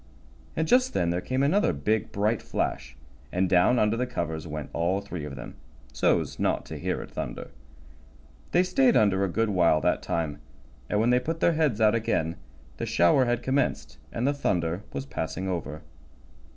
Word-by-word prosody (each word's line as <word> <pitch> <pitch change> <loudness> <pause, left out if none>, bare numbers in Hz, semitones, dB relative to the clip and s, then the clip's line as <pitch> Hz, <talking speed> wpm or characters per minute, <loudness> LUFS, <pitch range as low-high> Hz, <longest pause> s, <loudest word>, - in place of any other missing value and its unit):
And 160 0 0
just 255 +4 +3
then 85 - +1
there 90 +1 -1
came 130 +5 -1
another 155 - +3
big, 105 +9 -1
bright 105 +2 0
flash, 65 +2 -3 0.3
and 95 +1 +1
down 90 +8 +4
under 105 0 +2
the 125 +2 -1
covers 85 -8 -4
went 75 -3 -6
all 90 +4 +1
three 90 -6 -6
of 70 -2 -7
them, 60 - -8 0.4
so's 60 - +1
not - - 0
to - - -7
hear - - -2
it - - -13
thunder. - - -6 1.0
They 180 - +4
stayed 240 +7 +3
under 100 -2 +3
a 100 - 0
good 115 +5 0
while 85 -5 +4
that - - +1
time, 80 -3 -2 0.5
and 105 - +1
when 115 +3 +3
they 125 - +4
put 160 +6 -3
their 170 - +3
heads 150 -9 +1
out 110 -1 +5
again 85 -8 0 0.4
the - - -3
shower 85 +10 +4
had 120 0 -1
commenced, 135 +1 -1
and 120 - -2
the 145 - +2
thunder 90 - -1
was 70 -1 -4
passing 80 +6 -4
over. 85 -4 -4
100 Hz, 185 wpm, -27 LUFS, 85-125 Hz, 1.0 s, out